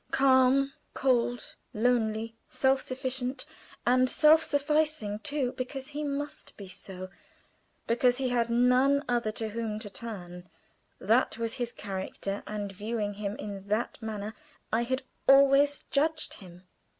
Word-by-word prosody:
Calm, 270 +1 +4 0.2
cold, 245 -2 +1 0.2
lonely, 225 -1 +1
self 265 0 +2
sufficing 260 0 -3 0.5
and 255 +1 +4
self 310 +3 +6
sufficing, 300 -7 0
too, 280 -2 -1
because 260 +2 -6
he 295 +1 -4
must 290 0 -5
be 200 - -9
so, 185 0 -9 0.8
because 245 +1 +3
he 260 -1 0
had 235 -1 +1
none 250 +4 +3
other 240 -3 0
to 220 0 -3
whom 220 -1 -3
to 215 -2 -8
turn 180 -4 -8 0.5
that 225 +4 +2
was 230 -1 -2
his 240 -1 -1
character, 195 0 -5
and 205 -1 -4
viewing 210 +1 -3
him 205 0 -4
in 200 -2 -7
that 215 +4 -1
manner 215 -1 -4 0.4
I 235 +2 +2
had 260 +3 -1 0.2
always 275 +1 +6
judged 310 +2 0
him. 180 -2 -13
240 Hz, 135 wpm, -29 LUFS, 210-270 Hz, 0.8 s, self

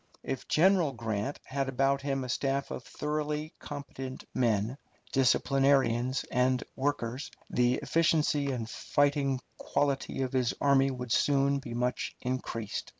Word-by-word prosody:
If 135 -1 -4
General 175 -3 +4
Grant 110 +2 -3
had 135 0 -2
about 135 +1 +2
him 135 -1 -1
a 125 - -6
staff 135 +2 -1
of - - -5
thoroughly 150 +1 -3
competent 135 -3 -7
men, 115 +1 +1 0.3
disciplinarians 135 -1 +3
and 125 0 +2
workers, 135 -1 -2 0.2
the 125 0 +3
efficiency 150 -1 +2
and 120 -4 -3
fighting 140 +1 +1 0.2
quality 140 -1 0
of 130 - -3
his 125 -2 +1
army 135 -1 +4
would 125 -2 -5
soon 140 +2 +3
be 120 -4 -7
much 125 +1 -1
increased. 120 -4 -3
135 Hz, 130 wpm, -30 LUFS, 125-140 Hz, 0.3 s, General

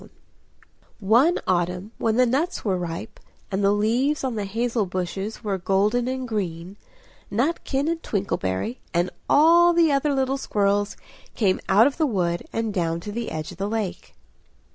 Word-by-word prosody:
One 235 - +4
autumn 180 +3 -1
when 225 -1 +1
the 250 +1 +5
nuts 280 +9 -1
were 195 -3 +1
ripe, 180 +5 -5 0.3
and 195 +1 -1
the 200 - +4
leaves 240 +9 +1
on 260 -2 -1
the 210 -2 -3
hazel 225 +1 -1
bushes 190 +5 -4
were 200 -3 -1
golden 205 +7 +1
and 260 0 -3
green 185 -4 -4 0.6
Nutkin 275 +4 0
and 330 0 -1
Twinkleberry 195 - -2 0.2
and 175 +1 +1 0.2
all 340 +3 +6
the 335 -2 +4
other 280 +1 +1
little 265 0 0
squirrels 205 -4 0 0.4
came 195 -5 +2
out 205 +4 +6
of 280 - 0
the 315 -2 +2
wood, 175 -7 -1
and 225 -2 -2
down 165 -3 -1
to 205 - -6
the 235 +2 -4
edge 155 -1 -5
of - - -13
the 200 +1 -1
lake. 215 -4 -4
215 Hz, 165 wpm, -24 LUFS, 190-260 Hz, 0.6 s, all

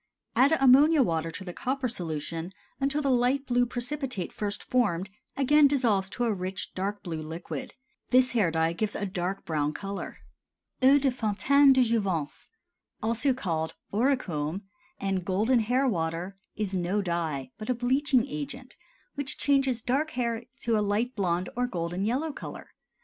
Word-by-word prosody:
Add 265 +6 +5
ammonia 275 +3 +6
water 165 -5 -1
to 165 +4 -7
the 180 -2 -7
copper 260 +4 -2
solution 165 -3 -4 0.3
until 285 +2 0
the 275 - +2
light 255 +3 +2
blue 245 -1 +2
precipitate 250 - -4
first 205 -1 -3
formed 200 -7 0 0.3
again 290 +2 +5
dissolves 230 -9 +1
to 245 - -3
a 230 -2 +2
rich, 185 0 -5
dark 200 +2 -3
blue 165 -3 -4
liquid. 160 -1 -6 0.3
This 255 0 +4
hair 215 -8 +2
dye 160 0 +1
gives 210 +4 -2
a 205 - -2
dark 190 0 -3
brown 150 -2 0
color. 200 0 -5 0.6
EAU 270 +2 +7
DE 275 -1 +2
FONTAINE 265 +5 +4
DE 260 -1 +4
JOUVENCE, 195 -10 -1 0.5
also 230 +5 +2
called 160 -9 -2 0.2
Auricome 200 - 0 0.4
and 195 -2 -1
Golden 215 +7 +2
Hair 250 +5 +2
Water, 170 0 -2 0.2
is 210 -2 -2
no 185 +3 0
dye, 160 -7 -2
but 215 - -7
a 250 - +2
bleaching 255 +1 +2
agent 245 - -6 0.4
which 285 0 -2
changes 270 -5 +2
dark 280 +5 +1
hair 235 -1 -1 0.2
to 230 -1 +1
a 210 - +2
light 210 +5 0
blond 180 -3 0
or 245 +1 0
golden 175 -2 -3
yellow 280 +7 -1
color. - - -9
215 Hz, 160 wpm, -28 LUFS, 180-255 Hz, 0.6 s, EAU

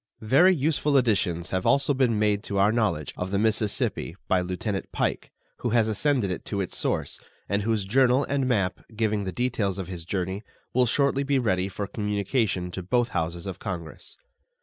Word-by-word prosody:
Very 175 - +5
useful 150 -1 +2
additions 95 -8 +1
have 95 -1 0
also 140 +1 +3
been 130 -5 +2
made 105 -1 +2
to 100 - -3
our 100 +2 +4
knowledge 105 - 0
of 90 - -3
the 100 - 0
Mississippi 105 -5 0
by 95 -1 +3
Lieutenant 95 +3 -3
Pike, - - -1 0.3
who 120 - -2
has 110 -2 +3
ascended 110 -1 +1
it 90 - -4
to 100 - -3
its 95 - -3
source, - - -1 0.3
and 100 +1 0
whose 110 -1 0
journal 130 +5 +4
and 140 -2 0
map, 100 -7 +1 0.2
giving 105 -2 0
the 95 - -2
details 110 -5 -1
of 95 -3 -4
his 90 -3 -6
journey, 95 +2 -3 0.3
will 125 0 +3
shortly 140 +3 +2
be 140 0 +1
ready 95 -6 +1
for 100 +1 -4
communication 105 -2 -1
to 95 - -5
both 120 +7 +1
Houses 85 +2 -3
of 95 -3 -6
Congress. 85 -7 -7
105 Hz, 185 wpm, -26 LUFS, 95-125 Hz, 0.3 s, Very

